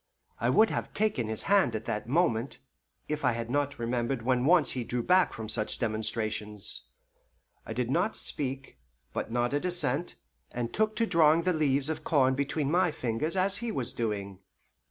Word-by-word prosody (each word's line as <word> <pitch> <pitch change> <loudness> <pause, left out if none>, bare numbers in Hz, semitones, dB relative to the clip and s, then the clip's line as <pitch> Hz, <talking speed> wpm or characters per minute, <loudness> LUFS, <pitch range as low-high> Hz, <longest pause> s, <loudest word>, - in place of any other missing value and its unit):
I 120 - +1
would 215 - +5
have - - -4
taken 205 - +1
his 110 0 -3
hand 195 - +3
that 110 0 -3
moment, 140 -5 +1 0.5
if 150 0 -3
I 125 - +3
had 115 0 -4
not 145 +1 0
remembered 120 +1 -1
when 125 0 +2
once 170 -1 +4
he 125 - -3
drew 120 +1 -2
back 185 +4 +4
from 110 -1 -6
such 110 0 -1
demonstrations. 110 -2 -2 0.8
I 110 - -4
did 125 +1 -1
not 180 +8 +1
speak, 135 - -4 0.3
but - - -3
nodded 120 +4 0
assent, 175 -3 0 0.4
and 120 -1 -3
took 215 0 +1
to 230 - +2
drawing 165 -3 +4
the 180 +1 +2
leaves 140 -3 +1
of 160 - -3
corn 130 -4 +3
between 140 +1 -1
my 180 +1 +3
fingers 140 +4 -2
as 190 +2 +1
he 235 -1 -3
was 130 - -3
doing. 100 -4 -3
130 Hz, 175 wpm, -29 LUFS, 115-165 Hz, 0.8 s, would